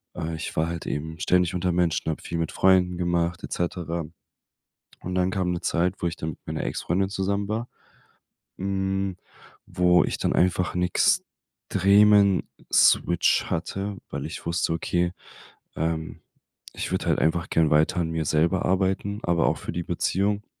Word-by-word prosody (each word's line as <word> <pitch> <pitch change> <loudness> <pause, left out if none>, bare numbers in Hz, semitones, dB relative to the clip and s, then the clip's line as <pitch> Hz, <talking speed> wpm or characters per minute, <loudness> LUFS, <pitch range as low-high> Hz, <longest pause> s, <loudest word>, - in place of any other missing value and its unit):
äh, 80 0 -3
ich 80 - -5
war 80 +1 +2
halt 85 -1 -5
eben 80 +2 -4
ständig 90 0 +2
unter 90 0 0
Menschen, 85 -2 0
habe 80 - -6
viel 85 - -4
mit 80 - -2
Freunden 90 -1 +3
gemacht, 85 -1 -1
et - - -5
cetera. 85 -1 -2 1.0
Und 90 +1 -4
dann 90 0 +1
kam 90 -1 -1
'ne 85 - -3
Zeit, 90 +3 0
wo 85 - +1
ich 85 - -4
dann 80 +1 -3
mit - - -13
meiner - - -4
Ex-Freundin 95 +3 -1
zusammen 100 +1 -1
war, 115 +3 -3 0.9
hm, 95 0 -1 0.5
wo 90 -1 +3
ich - - -2
dann - - 0
einfach 90 0 +1
'n 90 - +1 0.9
extremen 100 0 +5 0.2
Switch 85 -1 +4
hatte, 95 +4 -3
weil - - -4
ich - - -8
wusste: 85 -1 0
Okay, 85 +1 0 0.6
ähm, 80 0 -3 0.5
ich - - -4
würde - - -1
halt - - +2
einfach 80 +2 0
gern 80 -2 +3
weiter 75 +4 +3
an 80 -1 -2
mir 80 -1 -2
selber 85 +5 +1
arbeiten, 95 +2 0
aber 85 -1 +2
auch - - +1
für - - -6
die 85 - -3
Beziehung. 100 +5 -1
90 Hz, 165 wpm, -25 LUFS, 85-95 Hz, 1.0 s, extremen